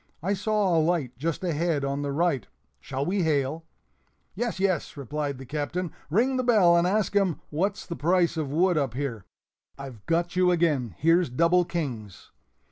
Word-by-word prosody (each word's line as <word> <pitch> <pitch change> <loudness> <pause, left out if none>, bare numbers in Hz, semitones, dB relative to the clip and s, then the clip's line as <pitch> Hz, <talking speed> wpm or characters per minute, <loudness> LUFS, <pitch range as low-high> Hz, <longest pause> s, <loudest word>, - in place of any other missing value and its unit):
I 195 +3 +1
saw 205 -2 +1
a - - +4
light 155 -6 0
just 165 +4 -2
ahead 165 -4 0
on 140 +1 -2
the 145 -1 -2
right 150 -3 0 0.3
shall 135 +1 -4
we 190 +2 0
hail?" 155 0 0 0.7
"Yes, 230 0 -3
yes," 185 -6 -1
replied 145 +1 -3
the 135 - -9
Captain; 155 +6 -3 0.2
"ring 245 - +2
the 255 - 0
bell 205 -8 +5
and 170 +1 +3
ask 205 +1 0
'em 190 -7 +2
what's 195 +7 -1
the 170 - -5
price 170 +2 +2
of 155 -4 -3
wood 175 +1 +2
up 135 -5 -2
here. 125 -8 -4 0.5
(I've 130 -6 -9
got 170 +1 0
you 180 0 +4
again; 150 - +1
here's 165 +1 +3
double 170 +7 +3
kings.)" 120 - -5
165 Hz, 175 wpm, -26 LUFS, 140-180 Hz, 0.7 s, bell